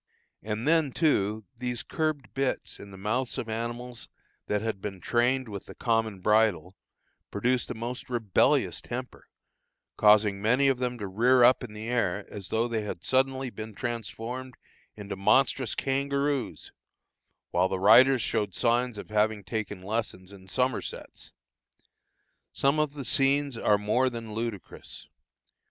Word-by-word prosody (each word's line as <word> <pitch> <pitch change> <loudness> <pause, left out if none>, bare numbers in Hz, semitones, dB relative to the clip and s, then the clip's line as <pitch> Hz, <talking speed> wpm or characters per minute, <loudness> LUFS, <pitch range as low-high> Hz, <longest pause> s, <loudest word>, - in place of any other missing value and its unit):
And 110 +4 -3
then, 160 -3 +3
too, 110 - +1
these 125 -1 -3
curbed 155 -4 -2
bits 135 -1 -2
in 100 - -10
the 95 - -11
mouths 110 +6 -1
of 115 - -3
animals 120 +1 -5 0.4
that 105 - +1
had 110 -4 -3
been 100 -2 -5
trained 125 +6 +1
with 100 -3 -7
the - - -10
common 110 -4 0
bridle, 105 -4 +2 0.5
produced 125 +5 0
a - - -4
most 120 +3 -6
rebellious 115 -6 +2
temper, 125 +1 -7 0.7
causing 105 -1 +5
many 125 +6 +3
of 130 -2 +1
them 125 -1 -2
to 105 - -5
rear 120 +6 +4
up 125 +2 +5
in 115 -4 -8
the 105 +1 -7
air 105 -5 0
as 100 -3 -7
though 115 +2 +1
they 115 -2 -1
had 105 -4 -6
suddenly 130 0 +1
been 110 -2 -8
transformed 120 +2 -5 0.4
into 105 -2 -6
monstrous 130 +4 +2
kangaroos, 140 0 -1 0.8
while 90 +2 +3
the 95 - -1
riders 120 +6 +6
showed 105 -5 -1
signs 120 -1 +1
of 105 - -9
having 105 -1 +1
taken 105 -2 -4
lessons 100 -3 -4
in 95 -2 -14
somersets. 130 +5 -3 1.2
Some 140 +3 +1
of 150 -2 0
the 140 -3 -6
scenes 140 +2 +2
are 105 -2 +3
more 110 +6 +1
than 115 -3 -7
ludicrous. 115 -4 -6
115 Hz, 145 wpm, -28 LUFS, 105-130 Hz, 1.2 s, riders